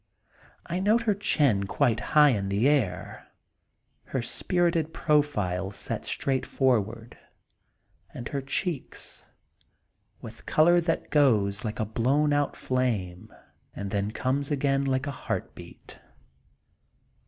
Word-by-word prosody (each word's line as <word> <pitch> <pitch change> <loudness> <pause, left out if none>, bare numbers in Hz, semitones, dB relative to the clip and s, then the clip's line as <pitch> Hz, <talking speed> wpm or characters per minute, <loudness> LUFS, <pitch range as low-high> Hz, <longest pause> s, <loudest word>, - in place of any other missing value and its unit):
I 175 - -3
note 215 +5 +3
her 215 -2 +2
chin 140 - +1
quite 110 +2 +1
high 150 +6 +5
in 100 -6 -1
the 100 +6 +2
air, 115 -12 -1 0.8
her 130 -3 -3
spirited 170 +1 0
profile 105 - +1
set 100 - -5
straight 135 -2 -1
forward, 115 -3 -1 0.9
and 120 - -7
her 140 - -2
y 135 - -10
cheeks, 170 -1 -4 0.9
with - - -12
color 175 +3 +4
that 165 -1 -2
goes 110 -9 +3
like 110 -1 -4
a 110 - 0
blown 135 +7 +1
out 145 -1 0
flame 110 -9 -2 0.4
and 100 -1 -5
then 100 -1 -1
comes 135 +5 -1
again 140 -1 +1
like 130 0 0
a 140 - -3
heart 115 -7 -4
beat. 85 -1 -14
130 Hz, 125 wpm, -27 LUFS, 105-150 Hz, 0.9 s, high